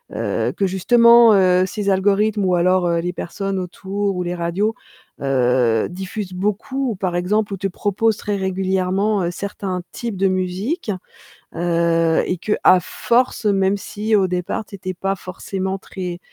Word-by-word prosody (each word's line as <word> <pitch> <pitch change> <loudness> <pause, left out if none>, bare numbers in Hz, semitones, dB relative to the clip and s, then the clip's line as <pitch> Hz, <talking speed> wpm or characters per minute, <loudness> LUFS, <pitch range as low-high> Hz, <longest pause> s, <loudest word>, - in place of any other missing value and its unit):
heu, - - -1
que 200 - 0
justement, 235 +4 +6
heu, 185 -1 +4
ces 200 +1 -3
algorithmes 200 +2 +2
ou 180 -1 +2
alors, 180 +1 +2
heu, 170 0 +1
les 175 +1 -2
personnes 195 +2 -4
autour 195 +2 -3
ou 180 - -2
les 175 0 -3
radios, 180 +6 -1 0.5
heu, 125 -4 +2
diffusent 190 +1 -6
beaucoup 210 +8 -2
ou, - - -4
par 185 -2 -2
exemple 205 +4 0
ou - - -3
te 195 - -1
proposent 205 +3 0
très 205 -1 -3
régulièrement, 190 +1 0
heu, 170 - -1
certains 190 -1 -4
types 230 -5 -5
de 195 +1 +2
musique, 185 - -2 0.6
heu 165 -1 +2
et 180 - -1
qu'à 185 0 +3
force, 240 +6 0
même 195 -1 +2
si 215 +2 -2
au 195 -2 +3
départ, 180 +4 -3
tu 200 - -10
étais 185 -1 -5
pas 195 +2 -2
forcément 190 +1 -4
très, 180 -2 -6
190 Hz, 160 wpm, -20 LUFS, 180-205 Hz, 0.6 s, justement